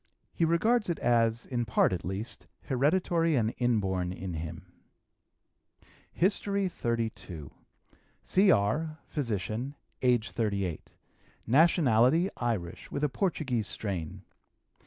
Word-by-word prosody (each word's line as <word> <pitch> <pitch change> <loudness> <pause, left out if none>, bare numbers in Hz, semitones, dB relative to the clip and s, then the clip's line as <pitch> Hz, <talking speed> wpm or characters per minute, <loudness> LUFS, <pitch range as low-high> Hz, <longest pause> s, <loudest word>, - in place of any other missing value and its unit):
He 165 - +2
regards 210 +7 +2
it 170 - 0
as, 115 -1 +2
in 120 -2 -1
part, 110 -4 +2
at 85 - -3
least, 95 +5 -5 0.2
hereditary 165 +4 +2
and 115 -3 +1
inborn 95 -7 +1
in 90 0 -5
him. 85 +2 -7 1.4
HISTORY 200 +1 +1
XXXII. 110 - -3 0.7
C.R., 155 - +2
physician; 115 - -3 0.3
age 120 -3 +2
38. 100 -7 -2 0.5
Nationality, 150 - +4
Irish, 105 -8 -3
with 140 - -3
a 150 - +3
Portuguese 130 - -1
strain. 90 -7 -5
120 Hz, 100 wpm, -29 LUFS, 100-160 Hz, 1.4 s, Nationality